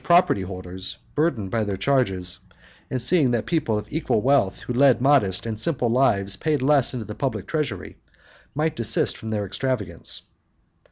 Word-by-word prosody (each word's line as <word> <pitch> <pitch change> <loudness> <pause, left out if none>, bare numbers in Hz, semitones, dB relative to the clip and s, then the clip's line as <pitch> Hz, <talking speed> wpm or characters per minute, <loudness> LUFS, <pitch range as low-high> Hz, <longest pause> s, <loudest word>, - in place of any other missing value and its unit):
property 175 - +4
holders, 95 0 -5 0.2
burdened 135 - 0
by 115 -2 +1
their 100 -2 -3
charges, 95 -7 +1 0.5
and 130 - -2
seeing 145 +2 +3
that 120 -2 0
people 150 -10 0
of 105 +3 -7
equal 160 -7 +1
wealth 130 -5 +2
who 125 - -4
led 130 0 +5
modest 125 -9 +3
and 110 -2 -4
simple 125 -1 0
lives 100 -6 +2
paid 155 -2 0
less 135 0 +3
into 120 -4 -5
the 105 - -6
public 135 +4 -3
treasury, 155 -4 -3 0.6
might 155 +2 0
desist 115 -1 0
from 110 - -7
their 105 -2 -1
extravagance. 100 -4 -3
120 Hz, 165 wpm, -24 LUFS, 100-140 Hz, 0.6 s, led